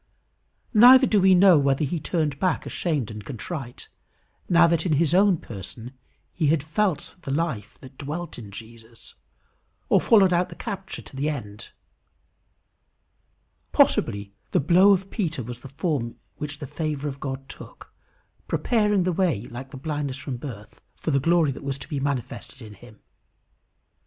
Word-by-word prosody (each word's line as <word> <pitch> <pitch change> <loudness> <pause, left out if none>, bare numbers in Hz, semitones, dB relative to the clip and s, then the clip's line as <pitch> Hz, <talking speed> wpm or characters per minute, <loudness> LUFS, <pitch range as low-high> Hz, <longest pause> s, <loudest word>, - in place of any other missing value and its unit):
Neither 250 +4 +8
do 210 -5 +3
we 190 0 +6
know 180 -3 +7
whether 140 +1 +1
he 160 +4 -2
turned 150 -3 -2
back 185 -4 0
ashamed 145 - -2
and 105 -1 -8
contrite, 135 - -7 0.6
now 170 -1 +6
that 165 -1 +2
in 175 - 0
his 155 +2 +2
own 190 -1 +4
person 115 - -9 0.4
he 160 -4 0
had 150 -1 +2
felt 170 +2 -1
the 140 - -8
life 140 -6 -2
that 130 0 -14
dwelt 155 +2 -5
in 105 -4 -10
Jesus, 115 +2 -13 0.8
or - - +4
followed 195 -5 +5
out 175 +1 +1
the - - -10
capture 195 -4 -6
to - - -14
the 140 +3 -1
end. 105 -9 -7 2.0
Possibly 100 0 +2 0.2
the 180 - +2
blow 180 +7 +5
of 195 0 +1
Peter 165 - -2
was 120 +1 -7
the 135 - -11
form 135 -4 -2 0.2
which 150 -1 -5
the 145 - -7
favour 150 0 -3
of 140 -1 -6
God 135 -1 -5
took, - - -12 0.5
preparing 210 -5 +1
the 180 0 0
way, 165 - +1
like 130 +3 -8
the 135 - -9
blindness 145 -1 -3
from 135 0 -6
the 145 - -6
birth, 105 -4 -11
for 160 - -3
the 140 - +3
glory 165 0 +3
that 135 - -9
was 140 -1 -3
to - - -11
be 145 - -3
manifested 135 -1 -4
in 110 -4 -11
him. 105 +2 -16
145 Hz, 165 wpm, -24 LUFS, 130-175 Hz, 2.0 s, Neither